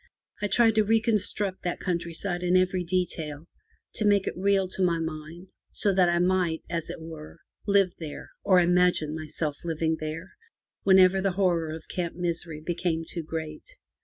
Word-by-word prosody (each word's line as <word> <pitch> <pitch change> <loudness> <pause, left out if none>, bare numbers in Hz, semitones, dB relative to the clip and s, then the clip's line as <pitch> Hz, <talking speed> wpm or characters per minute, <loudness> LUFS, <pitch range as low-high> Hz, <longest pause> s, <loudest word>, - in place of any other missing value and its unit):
I 205 - +1
tried 225 +2 +4
to 215 0 +4
reconstruct 210 -3 +1
that 175 - -3
countryside 175 +1 -2
in 180 +1 +3
every 185 0 +1
detail, 165 -4 -2 0.5
to - - -1
make 200 -1 +4
it - - -2
real 195 0 +2
to 190 - -4
my 175 -2 +3
mind, 160 +2 -6 0.2
so 200 - +1
that 180 -2 +4
I 175 - +2
might, 175 -2 +1
as 170 -2 -3
it - - -6
were, 160 -1 -9 0.3
live 200 -3 +3
there, 155 -3 -8
or 190 -2 +5
imagine 175 -3 +3
myself 155 -1 -4
living 160 -1 -1
there, 155 +4 -5 0.5
whenever 190 0 +5
the 195 -1 0
horror 175 -4 +1
of 160 0 -7
Camp 175 -2 -3
Misery 170 -3 -3
became 170 0 -1
too 170 - -4
great. 160 -1 -6
175 Hz, 165 wpm, -27 LUFS, 160-190 Hz, 0.5 s, or